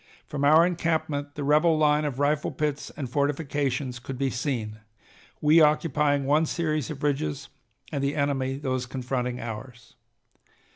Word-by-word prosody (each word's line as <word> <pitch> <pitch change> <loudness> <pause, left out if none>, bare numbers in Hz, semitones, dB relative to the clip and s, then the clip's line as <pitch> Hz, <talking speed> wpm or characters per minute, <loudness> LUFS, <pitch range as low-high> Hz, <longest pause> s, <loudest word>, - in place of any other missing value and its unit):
From 145 -1 -4
our 155 +4 +6
encampment 160 -4 -1
the 145 - -4
rebel 155 +3 +4
line 150 0 +3
of 140 -4 -3
rifle 145 +1 +1
pits 150 -1 -2
and 140 -4 -3
fortifications 140 -2 -1
could 130 +1 -7
be 135 0 0
seen, 120 -5 -3 0.6
we 155 +2 +6
occupying 150 -2 +2
one 150 +3 +3
series 155 -5 -1
of 150 -2 -7
ridges 135 - -1 0.4
and 140 - -2
the 140 +1 0
enemy 135 -2 0
those 130 -3 -2
confronting 125 -1 -3
ours. 115 +2 -8
145 Hz, 145 wpm, -26 LUFS, 130-150 Hz, 0.6 s, our